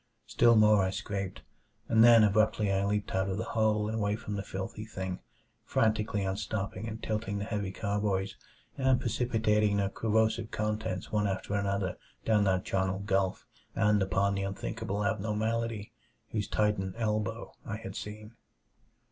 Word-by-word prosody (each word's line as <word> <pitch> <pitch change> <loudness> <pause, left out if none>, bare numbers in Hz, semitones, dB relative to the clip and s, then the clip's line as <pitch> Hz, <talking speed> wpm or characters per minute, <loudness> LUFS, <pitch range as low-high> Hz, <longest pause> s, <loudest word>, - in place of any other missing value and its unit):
Still 120 -1 +4
more 105 -1 +6
I 95 - +1
scraped, 100 -1 -4 0.4
and 115 -1 +5
then 115 -2 +8
abruptly 105 0 +3
I 95 0 +1
leaped 105 0 -1
out 95 +1 +1
of 95 - -2
the 110 - -1
hole 110 -1 +2
and 110 +1 -2
away 105 -1 +1
from 105 -1 -6
the 100 - -2
filthy 100 +3 -5
thing; 95 -4 -5 0.4
frantically 110 -2 +1
unstopping 95 +1 -3
and 110 +1 -7
tilting 105 -2 -2
the 100 - -3
heavy 100 -3 -2
carboys, 100 -1 -1 0.4
and 130 -1 +3
precipitating 110 -4 +1
their 100 -1 +1
corrosive 110 +1 +1
contents 105 -2 -3
one 105 -1 +1
after 95 +1 -3
another 100 -2 -1 0.3
down 105 -2 +3
that 95 -1 +1
charnel 95 0 0
gulf 95 -1 0 0.3
and 105 -1 +3
upon 95 +1 +1
the 100 - -1
unthinkable 100 +1 -3
abnormality 110 +1 -1 0.4
whose 105 -3 -1
titan 105 -3 0
elbow 105 -3 -2
I 105 - -4
had 115 +1 -8
seen. 105 +1 -7
105 Hz, 155 wpm, -30 LUFS, 100-110 Hz, 0.4 s, then